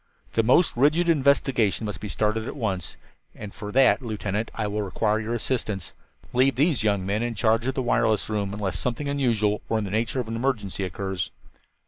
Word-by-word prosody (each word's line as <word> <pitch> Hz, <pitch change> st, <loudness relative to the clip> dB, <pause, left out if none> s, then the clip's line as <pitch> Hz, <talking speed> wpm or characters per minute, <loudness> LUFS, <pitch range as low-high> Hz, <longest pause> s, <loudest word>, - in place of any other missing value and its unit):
"The 115 Hz, -, +3 dB
most 130 Hz, +10 st, +3 dB
rigid 150 Hz, +7 st, +3 dB
investigation 135 Hz, -8 st, +2 dB
must 105 Hz, -, -5 dB
be 105 Hz, -, -4 dB
started 110 Hz, +3 st, 0 dB
at -, -, -5 dB
once, 100 Hz, -, -3 dB, 0.4 s
and 105 Hz, -2 st, -8 dB
for 105 Hz, 0 st, -7 dB
that, 135 Hz, +2 st, +5 dB
Lieutenant, 110 Hz, -2 st, -3 dB
I 110 Hz, -, -2 dB
will 105 Hz, +1 st, -2 dB
require 105 Hz, +2 st, 0 dB
your 115 Hz, +2 st, -2 dB
assistance. 110 Hz, -5 st, -3 dB, 0.4 s
Leave 130 Hz, +2 st, +3 dB
these 145 Hz, 0 st, +2 dB
young 100 Hz, -3 st, +1 dB
men 100 Hz, +3 st, 0 dB
in 120 Hz, -1 st, -2 dB
charge 110 Hz, +4 st, +2 dB
of 135 Hz, -, -1 dB
the 130 Hz, -, -1 dB
wireless 115 Hz, -3 st, +2 dB
room, 105 Hz, -2 st, -2 dB
unless 100 Hz, -2 st, -2 dB
something 125 Hz, +4 st, -2 dB
unusual 115 Hz, -7 st, +1 dB
or 110 Hz, -, +2 dB
in 110 Hz, -, -1 dB
the 100 Hz, -, -5 dB
nature 115 Hz, +4 st, 0 dB
of 125 Hz, -, -3 dB
an 115 Hz, -, -4 dB
emergency 110 Hz, -6 st, -1 dB
occurs. 95 Hz, 0 st, -3 dB
110 Hz, 195 wpm, -25 LUFS, 105-125 Hz, 0.4 s, that